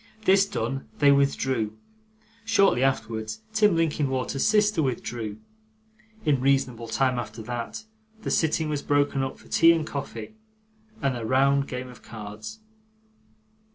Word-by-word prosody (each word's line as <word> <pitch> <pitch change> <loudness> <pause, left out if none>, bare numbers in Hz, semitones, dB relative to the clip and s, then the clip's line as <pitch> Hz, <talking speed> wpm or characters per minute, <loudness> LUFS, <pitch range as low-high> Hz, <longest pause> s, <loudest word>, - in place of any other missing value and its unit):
This 195 +1 +5
done, 135 - -3
they 145 -1 +5
withdrew; 130 -6 +1 0.7
shortly 200 - +3
afterwards, 115 - -1
Tim 210 -4 +4
Linkinwater's 140 -5 0
sister 210 -4 +3
withdrew; 120 -5 -3 0.9
in 140 -4 +2
reasonable 130 -4 +1
time 125 +2 +1
after 115 -1 -6
that, 120 - -5 0.4
the - - -2
sitting 160 0 +1
was 150 -2 -2
broken 145 -1 +1
up 135 0 -3
for - - -18
tea 165 0 +6
and 160 -2 -1
coffee, 145 +8 -6 0.7
and 135 -2 +1
a 120 - -5
round 135 +4 +3
game 125 0 -5
of 125 -1 -13
cards. 110 - -9
135 Hz, 130 wpm, -26 LUFS, 120-155 Hz, 0.9 s, tea